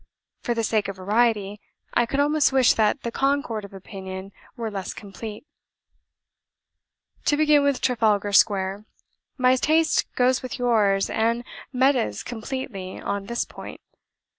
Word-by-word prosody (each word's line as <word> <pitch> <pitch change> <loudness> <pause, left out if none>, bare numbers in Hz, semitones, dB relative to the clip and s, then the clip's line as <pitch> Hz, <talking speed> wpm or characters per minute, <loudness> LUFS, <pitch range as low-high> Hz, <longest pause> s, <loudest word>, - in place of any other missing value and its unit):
For 240 - -1
the 230 - -1
sake 215 -2 +1
of 195 - -5
variety, 205 +1 +1 0.3
I 240 - +2
could 275 +3 -2
almost 295 0 +3
wish 260 -2 +5
that 220 +5 +1
the 235 - -3
concord 270 -5 0
of 200 - -10
opinion 190 0 -8 0.3
were 225 -2 -3
less 195 -2 -5
complete. 210 +3 -8 1.8
"To 290 - +3
begin 300 -1 +5
with 280 -2 +1
Trafalgar 215 -5 +1
Square. 195 0 +3 0.5
My 255 0 +4
taste 315 +4 +2
goes 255 +1 +2
with 255 - -6
yours 215 -6 +2
and 230 +2 0 0.3
Meta's 260 - +1
completely 225 -5 -6
on 200 0 -3
this 235 +2 -1
point. - - -10
230 Hz, 140 wpm, -24 LUFS, 200-260 Hz, 1.8 s, wish